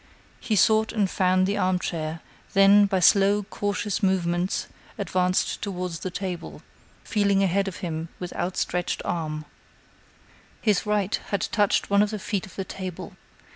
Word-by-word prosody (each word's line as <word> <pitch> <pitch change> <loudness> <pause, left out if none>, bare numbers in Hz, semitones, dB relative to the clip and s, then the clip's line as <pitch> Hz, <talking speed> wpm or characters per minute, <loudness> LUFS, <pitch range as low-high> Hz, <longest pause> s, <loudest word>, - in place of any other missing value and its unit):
He 220 - -1
sought 220 +3 +4
and 210 -4 +1
found 185 0 +2
the 200 +2 -1
armchair; 165 -3 -1 0.3
then, 200 +1 +6
by 190 -1 0
slow, 200 +3 +5
cautious 205 0 -2
movements, 180 -2 0 0.3
advanced 185 -1 0
toward 180 -3 -3
the 165 +3 -5
table, 180 -2 -6 0.4
feeling 200 -2 +2
ahead 195 +1 +1
of 195 - -4
him 160 0 -4
with 180 -1 -6
outstretched 180 -1 -2
arm. 155 -2 -3 1.1
His 210 -2 +1
right 210 -1 +1
had 200 - -1
touched 205 -1 +1
one 200 0 +5
of 210 - +2
the 215 - -3
feet 200 -1 -3
of - - -15
the 195 - -4
table. 185 -3 -7
190 Hz, 145 wpm, -25 LUFS, 180-205 Hz, 1.1 s, then